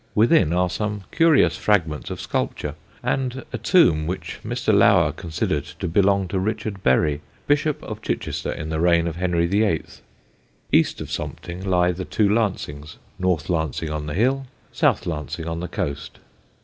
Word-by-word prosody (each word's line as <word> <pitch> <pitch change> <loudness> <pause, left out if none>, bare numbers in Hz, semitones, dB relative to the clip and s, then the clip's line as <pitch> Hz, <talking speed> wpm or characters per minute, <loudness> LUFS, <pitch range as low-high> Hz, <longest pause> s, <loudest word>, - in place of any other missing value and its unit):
Within 110 - +4
are 90 +1 +2
some 105 +2 -3
curious 150 - +4
fragments 80 -8 0
of - - -5
sculpture, - - -2 0.3
and 130 -1 -1
a 120 - -3
tomb 90 - +4
which 90 +2 -5
Mr. - - 0
Lower - - +5
considered 80 -2 -2
to - - -3
belong 100 +2 +2
to 95 - -1
Richard 105 0 -3
Bury, 70 +2 +2 0.2
Bishop 145 +1 +1
of - - -7
Chichester - - -3
in 80 - -5
the 80 0 -1
reign 85 0 +3
of 85 0 -4
Henry 85 -2 +1
VIII. 100 -2 +1 0.9
East - - +3
of - - -7
Sompting 90 +2 -5
lie 90 -2 +2
the 90 +1 -5
two 105 +2 +1
Lancings, 95 -9 -1 0.2
North 90 -4 0
Lancing 80 -2 -1
on 75 -1 -4
the 75 - -4
hill, 130 +6 +1 0.2
South - - +2
Lancing 80 0 -4
on 80 0 -3
the 90 - -4
coast. 70 -1 -4
90 Hz, 160 wpm, -23 LUFS, 80-105 Hz, 0.9 s, Lower